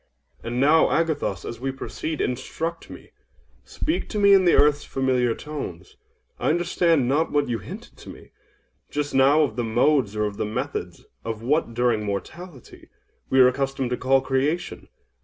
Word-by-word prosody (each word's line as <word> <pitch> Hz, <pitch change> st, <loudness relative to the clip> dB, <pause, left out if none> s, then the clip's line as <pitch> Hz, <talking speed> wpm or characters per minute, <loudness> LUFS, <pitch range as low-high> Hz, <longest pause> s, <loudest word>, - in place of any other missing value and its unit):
And 120 Hz, +1 st, -3 dB
now, 150 Hz, +4 st, +5 dB
Agathos, 160 Hz, -3 st, -1 dB
as 115 Hz, -, -6 dB
we 135 Hz, +2 st, -2 dB
proceed, 155 Hz, +3 st, -5 dB
instruct 160 Hz, +7 st, -4 dB
me!—speak 320 Hz, +3 st, -7 dB
to 215 Hz, -, -4 dB
me 200 Hz, -1 st, +6 dB
in 190 Hz, -1 st, +5 dB
the 175 Hz, -, +5 dB
earth's 145 Hz, 0 st, +4 dB
familiar 125 Hz, -3 st, 0 dB
tones. 95 Hz, -, -8 dB, 0.4 s
I -, -, 0 dB
understand 170 Hz, -4 st, +2 dB
not 150 Hz, +5 st, +1 dB
what 145 Hz, -1 st, +1 dB
you 120 Hz, -2 st, -2 dB
hinted 195 Hz, -, -10 dB
to -, -, -12 dB
me, -, -, -13 dB, 0.6 s
just 145 Hz, 0 st, -3 dB
now, 140 Hz, +4 st, +5 dB
of 145 Hz, -, -3 dB
the 120 Hz, -, 0 dB
modes 120 Hz, 0 st, +2 dB
or 105 Hz, 0 st, 0 dB
of 105 Hz, -1 st, -5 dB
the -, -, -1 dB
method 105 Hz, -, -4 dB, 0.3 s
of 115 Hz, -1 st, -5 dB
what, 130 Hz, -2 st, 0 dB
during 120 Hz, -3 st, +1 dB
mortality, 130 Hz, -, -7 dB, 0.4 s
we 130 Hz, -, +3 dB
were 125 Hz, -, +7 dB
accustomed 135 Hz, -1 st, -2 dB
to -, -, +1 dB
call 135 Hz, +1 st, +2 dB
Creation. 140 Hz, +7 st, -2 dB
135 Hz, 165 wpm, -24 LUFS, 120-155 Hz, 0.6 s, were